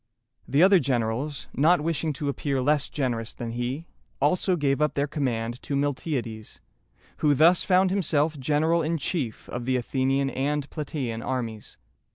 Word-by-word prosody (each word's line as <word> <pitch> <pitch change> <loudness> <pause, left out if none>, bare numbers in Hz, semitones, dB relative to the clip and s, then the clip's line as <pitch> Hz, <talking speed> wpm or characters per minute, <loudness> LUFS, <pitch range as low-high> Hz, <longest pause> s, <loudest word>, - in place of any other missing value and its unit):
] - - -57
The 145 +5 +4
other 190 0 +7
generals, 130 +1 -1
not 165 +6 +4
wishing 160 0 -1
to 145 +1 -4
appear 140 -1 -1
less 145 +2 +1
generous 120 -5 -2
than 115 -1 -5
he, 125 +7 -3 0.3
also 180 +6 +2
gave 145 -3 0
up 150 - +1
their 140 - +1
command 125 -5 -2
to 140 - -3
Miltiades, 135 -6 -3 0.6
who 145 -1 +3
thus 165 +5 +5
found 185 -1 +3
himself 160 -5 +1
general 155 +5 +2
in 165 +1 0
chief 140 - -3
of 120 -1 -5
the 130 0 +1
Athenian 135 +2 0
and 140 +2 -1
Platæan 135 -7 -4
armies. 115 -5 -4
140 Hz, 160 wpm, -26 LUFS, 125-155 Hz, 0.6 s, other